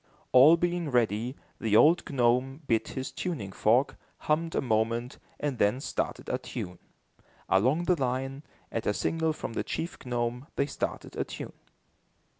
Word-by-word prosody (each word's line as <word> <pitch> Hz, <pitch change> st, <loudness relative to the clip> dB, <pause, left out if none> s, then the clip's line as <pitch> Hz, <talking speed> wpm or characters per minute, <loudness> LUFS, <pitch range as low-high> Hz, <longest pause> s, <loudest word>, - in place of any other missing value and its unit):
All 140 Hz, +6 st, +8 dB
being 175 Hz, -2 st, -1 dB
ready, 120 Hz, 0 st, +1 dB, 0.2 s
the 110 Hz, -2 st, +1 dB
old 165 Hz, +9 st, +5 dB
gnome 130 Hz, +2 st, +1 dB
bit 115 Hz, -4 st, +1 dB
his 130 Hz, +1 st, -3 dB
tuning 135 Hz, -, -4 dB
fork, 120 Hz, +8 st, +2 dB, 0.2 s
hummed 165 Hz, +2 st, 0 dB
a -, -, +2 dB
moment, 115 Hz, +1 st, 0 dB, 0.2 s
and 145 Hz, -4 st, -2 dB
then 105 Hz, +5 st, +3 dB
started -, -, -3 dB
a -, -, -1 dB
tune. 90 Hz, 0 st, -6 dB, 0.7 s
Along 130 Hz, -, +3 dB
the 175 Hz, -4 st, +1 dB
line, 135 Hz, +2 st, -1 dB, 0.3 s
at 115 Hz, -, -3 dB
a 105 Hz, -, +2 dB
signal 160 Hz, -1 st, 0 dB
from 150 Hz, -, -5 dB
the -, -, -1 dB
chief 170 Hz, -, -4 dB
gnome, 120 Hz, +2 st, -2 dB
they 140 Hz, -, +2 dB
started 140 Hz, -, -4 dB
a -, -, 0 dB
tune. -, -, -8 dB
130 Hz, 155 wpm, -29 LUFS, 115-150 Hz, 0.7 s, All